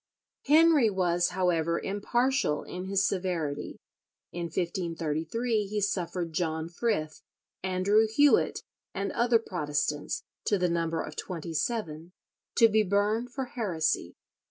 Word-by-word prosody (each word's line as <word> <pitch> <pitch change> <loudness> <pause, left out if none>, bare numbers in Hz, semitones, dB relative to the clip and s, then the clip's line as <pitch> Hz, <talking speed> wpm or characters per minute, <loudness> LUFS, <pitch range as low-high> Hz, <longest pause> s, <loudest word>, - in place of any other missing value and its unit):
Henry, 305 -5 +6
was, 175 -3 +1
however, 170 -2 +1
impartial 225 - 0
in 180 +1 -6
his 195 +1 +2
severity. 175 -6 -2 0.5
In 175 0 -4
1533 170 +6 -2
he 210 +1 -2
suffered 180 -4 -2
John 160 -1 -2
Frith, 170 -5 -2 0.4
Andrew 190 +4 +2
Hewett, 285 +6 +3 0.3
and 195 0 -2
other 235 0 +3
Protestants, 150 -8 -2 0.2
to 205 - +2
the 180 -1 +1
number 165 -1 -1
of 150 - -8
twenty 170 -2 -5
seven, 165 -2 -3 0.4
to 230 - +7
be 220 0 +3
burned 210 +4 +1
for 265 0 -3
heresy. 165 - -1
185 Hz, 120 wpm, -28 LUFS, 165-215 Hz, 0.5 s, to